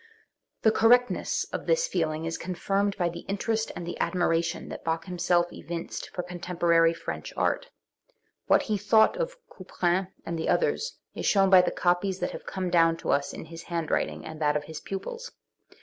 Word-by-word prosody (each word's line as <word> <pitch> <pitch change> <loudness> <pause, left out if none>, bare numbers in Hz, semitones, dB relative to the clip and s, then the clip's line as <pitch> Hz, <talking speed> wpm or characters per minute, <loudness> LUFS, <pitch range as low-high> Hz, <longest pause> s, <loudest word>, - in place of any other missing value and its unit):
The 220 - +6
correctness 245 +3 +3
of - - -4
tins - - +3
feeling 160 - -1
is 165 0 -2
confirmed 195 +3 -1
by 175 -3 +1
the 170 0 -5
interest 220 +3 -1
and 175 - -5
the 175 - -6
admiration 170 -2 0
that - - -7
Bach 165 0 -1
himself 175 -1 +1
evinced 170 0 -6
for 180 - -4
contem 180 0 -7
porary 165 -1 +4
French 165 - -6
art. - - 0 0.8
What - - +5
he 210 -2 -1
thought 220 - +4
of - - -2
Couperin 185 -1 -1 0.2
and 165 0 -3
the 160 - -1
others 480 0 +1 0.2
is - - -3
shewn 195 -1 +4
by 185 -1 +9
the - - 0
copies 180 +2 +1
that 180 - -2
have - - -9
come 185 -2 -3
down 165 -1 +4
to - - -2
us 140 0 +1
in - - -8
his 165 +1 -9
handwriting 170 -2 -2
and 160 0 -8
that 150 0 +3
of 150 - -5
his 160 +1 -7
pupils. 475 - -6
180 Hz, 185 wpm, -27 LUFS, 165-200 Hz, 0.8 s, by